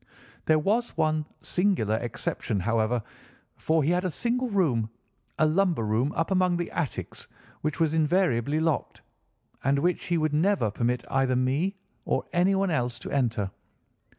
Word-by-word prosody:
There 155 - +4
was 215 +10 0
one 155 -1 +1 0.2
singular 180 - +1
exception, 110 -3 -2
however, 115 +3 +1 0.5
for 160 -1 +1
he 155 - +2
had 180 +1 +1
a 185 - 0
single 245 - -1
room, 140 - +1 0.5
a 155 - +4
lumber 165 - +2
room 115 +7 +1
up 165 +4 -1
among 185 -2 +3
the 175 - -3
attics, 165 -6 -4 0.3
which 150 -1 -2
was 160 -2 +2
invariably 155 -4 +2
locked, 160 -2 -1 0.6
and 135 +2 +2
which 175 +5 0
he 175 - +1
would 155 -1 0
never 160 - +2
permit 120 +3 -1
either 135 -1 +2
me 140 +10 0 0.3
or - - -1
anyone 190 +2 +2
else 125 -5 -1
to 115 - -8
enter. 115 -8 0
155 Hz, 150 wpm, -27 LUFS, 125-180 Hz, 0.6 s, There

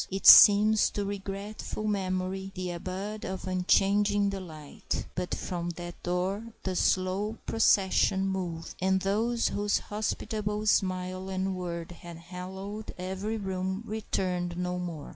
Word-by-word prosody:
It 195 +1 -4
seems 210 +1 +9
to 205 - -1
regretful 200 +2 -5
memory 190 -1 -2
the 180 -1 -3
abode 190 +4 -5
of 190 0 -5
unchanging 200 +2 +2
delight. 165 -7 -5
But 180 0 -2
from 175 -1 -4
that 175 0 -8
door 185 +5 -2 0.2
the 185 -1 -2
slow 190 +5 +1
procession 195 -3 +3
moved, 175 -4 -4
and 190 0 +2
those 225 +5 +1
whose 205 0 +1
hospitable 210 0 -3
smile 185 -2 0
and 190 0 -1
word 170 -2 -5
had 170 -1 -10
hallowed 190 +5 -7
every 190 +4 -3
room 190 0 -3
returned 180 -5 -2
no 180 0 -2
more. 170 -5 -6
190 Hz, 125 wpm, -29 LUFS, 180-205 Hz, 0.2 s, seems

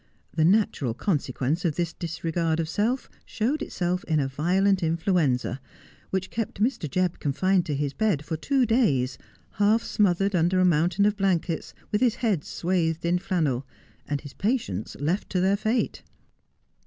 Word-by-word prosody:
The 160 - +2
natural 170 - +2
consequence 145 - -1
of 165 -5 0
this 170 -2 -1
disregard 165 -1 -2
of 165 - -1
self 225 +9 0 0.2
showed 265 +7 -1
itself 180 +1 -2
in 155 -2 +1
a 135 - +1
violent 185 +8 +2
influenza, 160 -6 +1 0.5
which 190 -1 -2
kept 225 -3 -3
Mr. 215 - 0
Jebb 180 +2 0
confined 185 +6 +1
to 150 - -1
his 140 0 -2
bed 195 -10 0
for 160 - -2
two 265 - +1
days, 140 - +1 0.3
half 210 +3 +2
smothered 195 -1 +1
under 175 +2 +2
a 185 - +4
mountain 175 +3 +3
of 210 0 +2
blankets, 180 -4 -1 0.2
with 210 - +1
his 240 -3 +3
head 210 -12 0
swathed 170 -2 -1
in 175 +1 +2
flannel 155 -9 -1 0.2
— - - -32
and 145 -1 -1
his 145 -3 -10
patients 200 - -2
left 165 +8 -1
to 185 - 0
their 190 +2 +3
fate. 220 +4 -1
175 Hz, 165 wpm, -26 LUFS, 155-200 Hz, 0.5 s, a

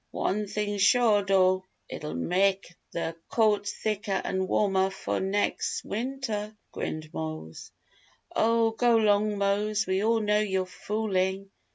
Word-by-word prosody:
One 210 +1 -1
thing 205 0 -2
sure, 215 0 +4
dough, 185 -1 +3 0.2
it'll 150 0 -6
mek' 190 0 0 0.2
th' 165 -1 -3 0.2
coat 210 -3 +2
thicker 210 -2 -2
an' 190 0 -1
warmer 190 -1 +2
fo' 195 - -3
nex' 195 +2 -1
winter!" 220 -3 -4 0.2
grinned 155 0 -5
Mose. 155 - -6 0.6
"Oh, 230 0 +3
go 235 +1 +3
'long, 210 -1 +3
Mose, 205 +2 +1
we 190 +2 0
all 225 +1 +3
know 210 -1 +2
you're 190 -3 0
foolin'!" 195 0 -2
205 Hz, 130 wpm, -27 LUFS, 190-215 Hz, 0.6 s, sure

